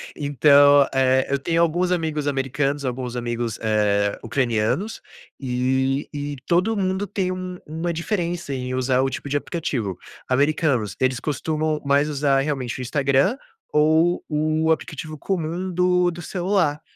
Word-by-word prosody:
Então, 145 Hz, 0 st, +5 dB
eh, 130 Hz, 0 st, +3 dB
eu 140 Hz, -, +1 dB
tenho 165 Hz, +4 st, +1 dB
alguns 175 Hz, +2 st, +1 dB
amigos 160 Hz, -4 st, -1 dB
americanos, 135 Hz, +1 st, -1 dB
alguns 125 Hz, -1 st, -3 dB
amigos, 120 Hz, -1 st, -3 dB
eh, 105 Hz, -2 st, +1 dB
ucranianos 130 Hz, -, -1 dB, 0.4 s
e 130 Hz, +1 st, 0 dB
e 145 Hz, 0 st, -4 dB
todo 185 Hz, +6 st, +2 dB
mundo 190 Hz, 0 st, -1 dB
tem 185 Hz, -1 st, -1 dB
um 185 Hz, 0 st, -5 dB
uma 165 Hz, +3 st, -3 dB
diferença 170 Hz, -3 st, -2 dB
em 125 Hz, -1 st, -4 dB
usar 130 Hz, 0 st, +1 dB
o 135 Hz, -, +1 dB
tipo 140 Hz, -, -6 dB
de 145 Hz, -, +1 dB
aplicativo. 125 Hz, -, -3 dB, 0.3 s
Americanos, 135 Hz, -, +1 dB
eles 130 Hz, -1 st, +1 dB
costumam 155 Hz, 0 st, -1 dB
mais 140 Hz, +2 st, +3 dB
usar 140 Hz, -2 st, +2 dB
realmente 135 Hz, -4 st, -3 dB
o -, -, -3 dB
Instagram 140 Hz, -, +1 dB, 0.3 s
ou 160 Hz, +3 st, +3 dB
o 155 Hz, +1 st, +1 dB
aplicativo 155 Hz, 0 st, -3 dB
comum 180 Hz, +2 st, -3 dB
do 180 Hz, 0 st, +2 dB
do 175 Hz, -, -8 dB
celular 175 Hz, -4 st, 0 dB
145 Hz, 140 wpm, -22 LUFS, 130-170 Hz, 0.4 s, Então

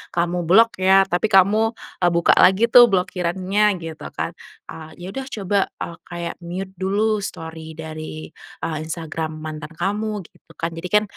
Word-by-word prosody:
kamu 175 Hz, 0 st, 0 dB
blok 225 Hz, +3 st, +5 dB
ya 190 Hz, +1 st, +6 dB
tapi 190 Hz, +3 st, 0 dB
kamu 215 Hz, +3 st, +4 dB, 0.2 s
e 175 Hz, -, +3 dB
buka 170 Hz, 0 st, +3 dB
lagi 220 Hz, +5 st, +5 dB
tuh 240 Hz, -1 st, +9 dB
blokirannya 190 Hz, +2 st, +1 dB
gitu 160 Hz, -1 st, -7 dB
kan. -, -, -2 dB, 0.4 s
A 160 Hz, -1 st, -10 dB
ya 180 Hz, +2 st, -8 dB
udah 270 Hz, +2 st, -5 dB
coba 200 Hz, -5 st, -1 dB, 0.2 s
a 170 Hz, -, -8 dB
kayak 170 Hz, 0 st, -6 dB
mute 185 Hz, +2 st, -6 dB
dulu 210 Hz, +3 st, +1 dB
story 160 Hz, -4 st, -7 dB
dari 155 Hz, 0 st, -7 dB, 0.3 s
e -, -, 0 dB, 0.2 s
Instagram 160 Hz, -1 st, -4 dB
mantan 155 Hz, +1 st, -7 dB
kamu 205 Hz, +3 st, -2 dB
gitu -, -, -22 dB
kan 165 Hz, 0 st, -3 dB
jadikan 180 Hz, +6 st, +1 dB
180 Hz, 155 wpm, -21 LUFS, 165-205 Hz, 0.4 s, tuh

